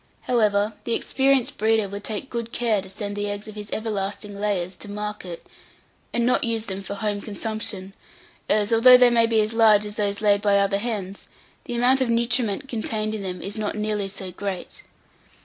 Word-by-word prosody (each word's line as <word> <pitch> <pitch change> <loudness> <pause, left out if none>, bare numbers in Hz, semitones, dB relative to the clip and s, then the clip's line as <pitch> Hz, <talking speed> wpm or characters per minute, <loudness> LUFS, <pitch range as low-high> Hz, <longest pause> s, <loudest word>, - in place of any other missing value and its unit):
However, 215 -3 +2
the 235 - 0
experienced 270 -2 +1
breeder 220 -1 +2
would 200 +1 -7
take 220 +6 -5
good 235 -1 -4
care 225 -5 +1
to 190 - -11
send 205 +1 -5
the 205 0 -2
eggs 205 +1 -5
of 215 - -8
his 210 0 -8
everlasting 205 -1 -4
layers 195 -3 -1
to 205 - -9
market, 210 -4 -6 0.7
and 235 - +1
not 250 - +2
use 225 -1 -1
them 195 -1 -4
for 200 +1 -6
home 205 0 -2
consumption, 205 -2 -4 0.6
as, 210 +1 +2
although 250 +3 +9
they 250 -1 +6
may 230 -1 +4
be 225 -1 +3
as 215 +1 -1
large 215 -2 +5
as 210 0 -6
those 205 -1 0
laid 205 -1 +3
by 205 -1 +3
other 200 0 +2
hens, 200 -4 -4 0.4
the 240 - -4
amount 255 +3 +3
of 255 - +1
nutriment 235 +1 +1
contained 220 -3 -2
in 215 - -4
them 185 -2 -5
is 205 +2 -4
not 210 -1 -2
nearly 210 -1 -1
so 190 -1 -7
great. 190 0 -5
210 Hz, 195 wpm, -24 LUFS, 200-230 Hz, 0.7 s, although